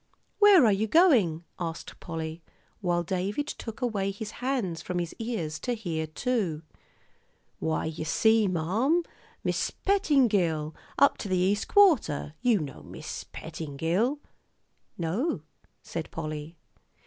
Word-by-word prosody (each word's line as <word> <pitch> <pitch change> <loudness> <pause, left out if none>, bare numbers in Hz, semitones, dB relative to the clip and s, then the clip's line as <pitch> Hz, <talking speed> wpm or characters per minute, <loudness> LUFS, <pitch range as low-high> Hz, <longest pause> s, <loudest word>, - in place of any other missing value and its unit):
"Where 405 - +8
are 215 - +5
you 205 +3 +1
going?" 220 - +4 0.2
asked 165 -2 -5
Polly, 160 0 -5 0.4
while 175 -3 +1
David 190 - -1
took 240 -5 -6
away 205 -5 0
his 205 +2 -5
hands 245 -11 -1
from 180 - -3
his 175 -2 -2
ears 200 -10 -3
to 245 - -1
hear, 165 -8 -3
too. 175 - -1 1.0
"Why, 160 - -1
you 160 0 -4
see, 220 +6 +3
marm, 210 - +1 0.4
Mis' - - 0
Pettingill, 205 - +2 0.2
up 280 - +5
to 205 - -5
th'East 185 +2 +1
Quarter 310 - +4
you 245 -3 +4
know 145 -4 -6
Mis' - - -7
Pettingill?" 165 - -1 0.8
"No," 175 - -1 0.4
said 165 -1 -5
Polly. 155 +1 -6
185 Hz, 125 wpm, -28 LUFS, 160-245 Hz, 1.0 s, Where